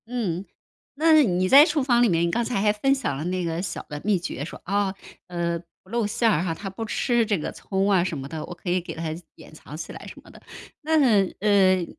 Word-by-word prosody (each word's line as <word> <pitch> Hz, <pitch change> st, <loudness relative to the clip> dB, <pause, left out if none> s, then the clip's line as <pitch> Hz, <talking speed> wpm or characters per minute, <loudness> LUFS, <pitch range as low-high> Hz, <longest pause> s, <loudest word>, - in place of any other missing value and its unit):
嗯， 200 Hz, -7 st, -3 dB, 0.5 s
那 320 Hz, +3 st, +4 dB
你 185 Hz, -5 st, +1 dB
在 280 Hz, +8 st, +9 dB
厨 300 Hz, -4 st, 0 dB
房 240 Hz, -2 st, +3 dB
里 240 Hz, -, +4 dB
面 170 Hz, -2 st, +2 dB
你 -, -, -1 dB
刚 235 Hz, +6 st, 0 dB
才 235 Hz, -2 st, -2 dB
还 210 Hz, 0 st, +3 dB
分 270 Hz, +6 st, +2 dB
享 260 Hz, -, -2 dB
了 150 Hz, -, -4 dB
那 180 Hz, 0 st, -2 dB
个 165 Hz, +1 st, -2 dB
小 180 Hz, -3 st, -5 dB
的 150 Hz, -1 st, -8 dB
秘 205 Hz, -2 st, +2 dB
诀， 170 Hz, -5 st, -5 dB
说， 160 Hz, -, -8 dB
啊， 200 Hz, 0 st, 0 dB, 0.3 s
呃， 170 Hz, -1 st, -2 dB, 0.2 s
不 185 Hz, -, -21 dB
露 230 Hz, -1 st, 0 dB
馅 230 Hz, +2 st, +1 dB
儿 170 Hz, -6 st, +1 dB
哈， 170 Hz, -3 st, -1 dB
他 195 Hz, +4 st, -7 dB
不 195 Hz, +4 st, -6 dB
吃 235 Hz, +1 st, +1 dB
这 210 Hz, -2 st, 0 dB
个 155 Hz, -, -4 dB
葱 195 Hz, 0 st, -2 dB
啊 185 Hz, -3 st, +4 dB
什 175 Hz, -4 st, -3 dB
么 135 Hz, 0 st, -6 dB
的， 155 Hz, +1 st, -6 dB
我 -, -, -8 dB
可 175 Hz, -, -7 dB
以 180 Hz, +1 st, +1 dB
给 170 Hz, -2 st, -8 dB
他 165 Hz, 0 st, -4 dB, 0.3 s
掩 -, -, -15 dB
藏 155 Hz, -1 st, -11 dB
起 160 Hz, -, -7 dB
来 -, -, -10 dB
什 -, -, -11 dB
么 -, -, -17 dB
的。 -, -, -16 dB, 0.4 s
但， 315 Hz, +1 st, +2 dB, 0.4 s
呃， 190 Hz, -3 st, +3 dB
190 Hz, 265 characters per minute, -24 LUFS, 170-230 Hz, 0.5 s, 在